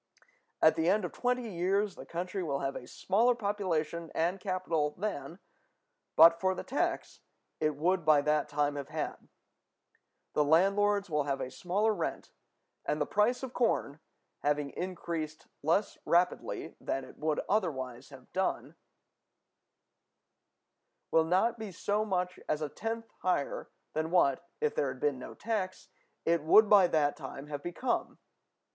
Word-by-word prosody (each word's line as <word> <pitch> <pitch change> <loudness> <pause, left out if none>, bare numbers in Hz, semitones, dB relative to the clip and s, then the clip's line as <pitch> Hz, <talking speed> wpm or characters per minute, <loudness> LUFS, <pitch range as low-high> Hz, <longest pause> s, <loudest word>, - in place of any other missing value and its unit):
At 160 - +7
the 165 +1 +2
end 205 0 +2
of 175 - -4
twenty 250 -1 -1
years 195 +2 0
the - - -11
country 180 +3 -3
will 140 -5 -2
have 135 0 -2
a 125 - -7
smaller 230 +6 +2
population 170 -7 -2
and 175 +4 +1
capital 170 -6 -1
than, 180 -4 -4 0.8
but 165 +1 +8
for 190 0 +2
the - - -5
tax, 275 - -2 0.4
it 155 -1 +1
would 175 +4 +1
by 150 -2 +5
that 150 0 +1
time 145 0 0
have 140 - -5
had; - - -5 1.0
the 150 - +3
landlords 200 +6 +3
will 150 -4 0
have 140 -1 -1
a 130 - -4
smaller 205 +5 +1
rent, - - -4 0.5
and 150 - -1
the 150 - +1
price 230 - +1
of 260 -1 -5
corn, 160 - 0 0.4
having 145 -1 0
increased 170 -4 -4 0.2
less 170 +8 +1
rapidly 175 +1 0
than 135 - -2
it - - -15
would 155 -1 0
otherwise 135 - -1
have 135 -3 -15
done, 190 0 -1 2.4
will 160 0 +4
not 210 +8 +2
be 215 -3 -5
so 205 +4 0
much 180 -3 -1
as 155 0 0
a 150 - -2
tenth 225 +6 -5
higher 180 -6 -1 0.2
than 160 +1 -1
what, 170 -2 +2
if 150 - +1
there 140 - 0
had 130 -1 -5
been 145 -2 0
no - - -9
tax, 205 -4 -3 0.4
it 170 -1 +3
would 210 +8 +6
by 200 -3 +7
that 150 -4 +2
time 135 -1 -8
have 145 -1 -5
become. 175 - -2
170 Hz, 150 wpm, -31 LUFS, 150-200 Hz, 2.4 s, but